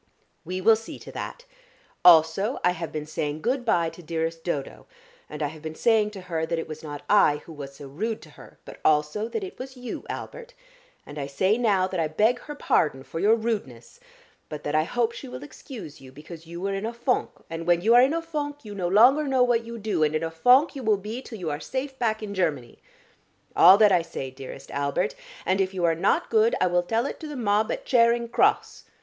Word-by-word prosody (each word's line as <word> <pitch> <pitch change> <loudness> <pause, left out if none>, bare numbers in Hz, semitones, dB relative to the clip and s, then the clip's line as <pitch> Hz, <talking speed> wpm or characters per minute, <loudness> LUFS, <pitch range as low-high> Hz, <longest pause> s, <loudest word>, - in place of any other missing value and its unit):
"We 185 +2 -4
will 225 +4 +6
see 225 +1 -8
to - - -11
that. - - -7 0.6
Also, 175 - +5
I 180 - +4
have 170 -2 -5
been 155 -1 -4
saying 150 0 -4
good 250 +3 0
bye 170 -8 +1
to 165 - -13
dearest 165 0 -3
Dodo, 145 -6 -4 0.4
and 150 0 -5
I 145 - 0
have 155 +1 -12
been 160 0 -6
saying 220 0 +3
to - - -8
her 165 -3 -3
that 165 +1 -1
it 165 - -4
was 155 0 -8
not 145 -2 -8
I 150 -8 +4
who 165 - -10
was 140 -2 -9
so 140 - -10
rude 215 +11 -3
to - - -15
her, - - -15
but - - -11
also 150 +8 +2
that 395 - -4
it 380 - -8
was 260 0 -8
you, 250 -1 -6
Albert. - - -7 0.5
And 145 +1 -8
I 140 - -3
say 185 +9 +1
now 210 -6 +2
that 185 -1 -3
I 160 - +1
beg 215 +10 +2
her 295 +3 -9
pardon 135 - +1
for 135 +5 -6
your 210 +5 +4
rudeness, 205 - -4 0.5
but 150 -1 -7
that 145 - -3
I 155 0 +3
hope 235 +4 0
she - - -9
will 125 +2 -8
excuse 160 - -10
you 130 -1 -13
because 160 +4 -12
you 170 +1 -8
were 195 +2 -2
in 195 +3 -3
a 235 - -5
fonk, 240 +2 0 0.2
and 165 +1 -6
when 175 -1 +3
you 225 +5 +4
are 245 - +8
in 270 +5 +3
a 330 - -2
fonk, 290 -4 -5
you 210 - -7
no 185 -3 -2
longer 250 +10 +5
know 260 -2 +3
what 240 -2 +1
you 235 0 -7
do, 215 -6 -2
and 155 0 +2
in 155 - -1
a 165 - -2
fonk 250 - +4
you 270 - -5
will 215 -3 +2
be 215 +6 -6
till 235 -4 -9
you 170 -5 -3
are 145 - -3
safe 265 - -5
back 220 -2 0
in 205 -1 -5
Germany. 155 -11 -2 0.8
All 185 +3 +8
that 210 -1 +6
I 175 - +4
say, 165 -5 -6
dearest 135 +1 -10
Albert, 140 - -1 0.3
and 190 +1 +2
if 190 0 -2
you 180 - -2
are 165 - +3
not 165 - 0
good 225 0 +4
I - - +3
will 175 0 +2
tell 225 +7 -1
it - - -5
to 315 - -7
the 295 - -7
mob 215 -3 +1
at - - -4
Charing 235 -1 +3
Cross. - - +1
185 Hz, 240 wpm, -25 LUFS, 155-235 Hz, 0.8 s, are